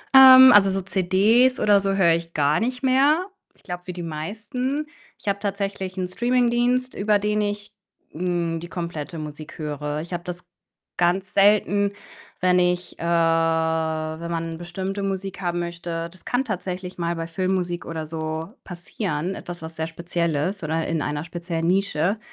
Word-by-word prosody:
Ähm, 260 Hz, -1 st, +11 dB
also 195 Hz, -1 st, +7 dB
so 195 Hz, 0 st, -1 dB
CDs 200 Hz, +8 st, +3 dB
oder 205 Hz, -1 st, +5 dB
so 195 Hz, 0 st, 0 dB
höre 180 Hz, -4 st, +4 dB
ich 165 Hz, 0 st, -3 dB
gar 145 Hz, 0 st, +2 dB
nicht 250 Hz, +3 st, -2 dB
mehr. 280 Hz, +7 st, +3 dB, 0.3 s
Ich -, -, -23 dB
glaube, 180 Hz, -2 st, -6 dB
wie 180 Hz, -, -4 dB
die 175 Hz, -1 st, -6 dB
meisten. 225 Hz, -, -3 dB, 0.3 s
Ich -, -, -18 dB
habe 200 Hz, 0 st, 0 dB
tatsächlich 195 Hz, -2 st, -3 dB
'n 185 Hz, -1 st, -1 dB
Streaming-Dienst, 245 Hz, +4 st, +1 dB
über 210 Hz, +1 st, +2 dB
den 210 Hz, +1 st, 0 dB
ich, 205 Hz, 0 st, -4 dB, 0.4 s
hm, 170 Hz, -1 st, -1 dB
die 170 Hz, +1 st, -9 dB
komplette 170 Hz, -2 st, -5 dB
Musik 150 Hz, 0 st, -8 dB
höre. 150 Hz, -1 st, -3 dB
Ich 170 Hz, +3 st, -8 dB
habe 175 Hz, 0 st, -3 dB
das 180 Hz, 0 st, -6 dB, 0.5 s
ganz 185 Hz, +2 st, +1 dB
selten, 205 Hz, 0 st, +4 dB, 0.5 s
wenn 180 Hz, 0 st, +4 dB
ich, 180 Hz, 0 st, -1 dB
äh -, -, -6 dB
wenn 165 Hz, -1 st, +1 dB
man 165 Hz, 0 st, -3 dB
bestimmte 190 Hz, +3 st, -4 dB
Musik 195 Hz, 0 st, -3 dB
haben 175 Hz, -1 st, -1 dB
möchte. 170 Hz, -1 st, -4 dB
Das 185 Hz, -, -14 dB
kann 255 Hz, +2 st, 0 dB
tatsächlich 185 Hz, -3 st, -5 dB
mal 170 Hz, 0 st, -1 dB
bei 165 Hz, 0 st, -4 dB
Filmmusik 180 Hz, 0 st, -2 dB
oder 160 Hz, -1 st, -5 dB
so 160 Hz, +3 st, -5 dB
passieren, 175 Hz, -1 st, -4 dB
etwas 175 Hz, -3 st, -8 dB
was 160 Hz, 0 st, -7 dB
sehr 160 Hz, 0 st, -2 dB
speziell 170 Hz, 0 st, -2 dB
ist 180 Hz, +8 st, -1 dB
oder 160 Hz, +1 st, -1 dB
in 165 Hz, -1 st, -1 dB
einer 150 Hz, +1 st, -2 dB
speziellen 170 Hz, -1 st, -4 dB
Nische, 190 Hz, +1 st, +1 dB
180 Hz, 165 wpm, -23 LUFS, 165-200 Hz, 0.5 s, Ähm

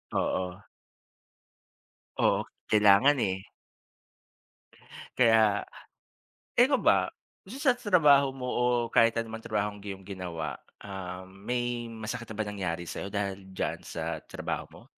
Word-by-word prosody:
Oo. 90 Hz, -1 st, -1 dB, 1.6 s
Oo, -, -, +3 dB, 0.2 s
kailangan, 105 Hz, +6 st, +6 dB
eh. 95 Hz, -2 st, -1 dB, 1.8 s
Kaya, 110 Hz, -4 st, +5 dB, 1.0 s
ikaw 265 Hz, +3 st, +6 dB
ba, -, -, +4 dB, 0.4 s
dito 215 Hz, -, -8 dB
sa 270 Hz, -, +6 dB
trabaho 150 Hz, -, +4 dB
mo 125 Hz, -1 st, -5 dB
o 120 Hz, -, 0 dB, 0.3 s
kahit 115 Hz, 0 st, +5 dB
ano 115 Hz, -1 st, -2 dB
man 115 Hz, -, -5 dB
trabahong 105 Hz, -2 st, -2 dB
iyong 100 Hz, -1 st, -7 dB
ginawa, 85 Hz, -7 st, -5 dB, 0.2 s
ah, 95 Hz, -2 st, -6 dB
may 120 Hz, +5 st, -3 dB
masakit 115 Hz, +2 st, -6 dB
na 110 Hz, -, -8 dB
ba 110 Hz, -, -1 dB
nangyari 95 Hz, -5 st, -3 dB
sayo 90 Hz, +3 st, -5 dB
dahil 100 Hz, -1 st, -3 dB
diyan 95 Hz, -, -2 dB
sa -, -, -3 dB
trabaho -, -, -4 dB
mo? -, -, -14 dB
105 Hz, 120 wpm, -29 LUFS, 95-120 Hz, 1.8 s, kailangan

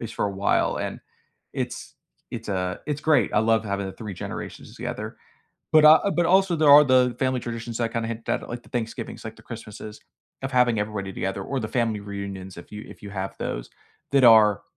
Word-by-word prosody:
least 115 Hz, -, -7 dB
for -, -, -1 dB
a 100 Hz, -, 0 dB
while, 100 Hz, +1 st, +1 dB
and -, -, -4 dB, 0.5 s
it's -, -, -5 dB, 0.4 s
it's, 115 Hz, -2 st, -7 dB
uh, 90 Hz, -1 st, -1 dB
it's 145 Hz, -1 st, -2 dB
great. 155 Hz, 0 st, +3 dB
I 105 Hz, -, +4 dB
love 110 Hz, -1 st, +2 dB
having 100 Hz, -1 st, -2 dB
the 95 Hz, -, -6 dB
3 105 Hz, -4 st, -7 dB
generations -, -, -7 dB
together. -, -, -5 dB, 0.6 s
But, 155 Hz, -1 st, +7 dB
uh 160 Hz, +6 st, +7 dB
but, 175 Hz, -, +3 dB
also, 190 Hz, -1 st, +4 dB
there 155 Hz, -2 st, +5 dB
are 145 Hz, +1 st, +10 dB
the 125 Hz, -2 st, +4 dB
family 130 Hz, -1 st, +1 dB
traditions 115 Hz, 0 st, -5 dB
that 115 Hz, -1 st, -1 dB
kinda 115 Hz, -1 st, -2 dB
hit 115 Hz, 0 st, -5 dB
that -, -, -2 dB
like 120 Hz, 0 st, -6 dB
the -, -, -17 dB
Thanksgivings, 115 Hz, -1 st, -5 dB
like 110 Hz, 0 st, -7 dB
the -, -, -17 dB
Christmases 110 Hz, -2 st, -9 dB, 0.4 s
of 135 Hz, -, -3 dB
having 125 Hz, -3 st, +3 dB
everybody 100 Hz, -2 st, -4 dB
together 95 Hz, +1 st, -3 dB
or 135 Hz, +3 st, -3 dB
the 110 Hz, -, -4 dB
family 115 Hz, -4 st, 0 dB
reunions 100 Hz, -2 st, -7 dB
if 85 Hz, -, -13 dB
you 105 Hz, +1 st, -7 dB
if -, -, -13 dB
you 100 Hz, -, -8 dB
have 95 Hz, -1 st, -5 dB
those, -, -, -4 dB, 0.4 s
that 135 Hz, -2 st, +5 dB
are 110 Hz, -3 st, +7 dB
115 Hz, 210 wpm, -25 LUFS, 100-125 Hz, 0.6 s, are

